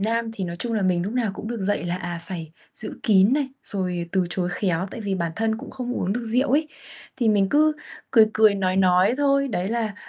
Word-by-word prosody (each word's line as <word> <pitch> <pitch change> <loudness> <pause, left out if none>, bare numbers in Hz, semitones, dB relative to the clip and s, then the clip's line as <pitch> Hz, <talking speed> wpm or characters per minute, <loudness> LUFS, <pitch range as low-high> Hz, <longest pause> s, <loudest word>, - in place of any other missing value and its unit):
Nam 225 +2 -1
thì 195 - -3
nói 170 -1 -5
chung 235 +6 -2
là 215 -3 0
mình 180 -2 +1
lúc 200 +4 -4
nào 240 -4 0
cũng 215 - -7
được 235 -2 -4
dạy 200 0 0
là, 175 0 -2
à, 175 -1 -5
phải 165 -4 -7 0.2
giữ 220 - -1
kín 200 +1 +4
này, 280 -1 +1
rồi 180 -5 -1
từ 190 -2 +2
chối 175 -1 +1
khéo, 180 -2 -1
tại - - -7
vì 200 -3 -2
bản 170 -3 -2
thân 220 0 0
cũng - - -9
không 250 -1 -5
uống 190 -4 -1
được 240 +3 -3
rượu 250 +5 +2
ấy. 305 +3 +2 0.5
Thì 235 -4 +1
mình 200 -2 +3
cứ 305 +6 +4 0.4
cười 225 -4 +6
cười 215 -1 +5
nói 185 -1 0
nói 185 +3 +4
thôi, 275 -1 +2
đấy 190 -5 -2
là, 225 -2 -2
205 Hz, 245 wpm, -23 LUFS, 185-235 Hz, 0.5 s, cười